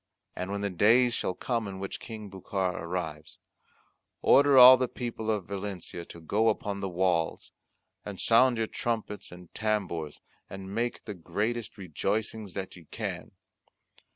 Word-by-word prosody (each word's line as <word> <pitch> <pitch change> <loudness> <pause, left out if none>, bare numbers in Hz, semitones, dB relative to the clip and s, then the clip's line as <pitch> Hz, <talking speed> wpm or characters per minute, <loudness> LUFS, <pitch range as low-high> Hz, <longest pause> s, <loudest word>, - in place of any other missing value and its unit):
And 90 +1 -4
when 100 0 -3
the 100 -1 -1
day 115 +7 +5
shall 95 -5 -2
come 115 -1 -2
in 95 -1 -6
which 95 0 -5
King 110 -2 -8
Bucar 95 -1 -2
arrives, 80 -3 -5 0.9
order 140 -1 +6
all 130 0 +12
the 130 0 0
people 115 -3 -5
of 105 -4 0
Valencia 95 -3 -6
to 85 - -11
go 105 +7 +2
upon 100 -2 -2
the 100 -1 -3
walls, 90 -2 0 0.5
and 100 -2 -7
sound 120 +1 +5
your 115 - +1
trumpets 110 -2 -3
and 90 -1 -13
tambours 95 -9 -2 0.3
and 95 0 -8
make 120 +2 -2
the 105 - -5
greatest 105 +6 -3
rejoicings 100 +3 -3
that 95 -2 -5
ye 85 -2 -14
can. - - -5
100 Hz, 155 wpm, -29 LUFS, 90-115 Hz, 0.9 s, all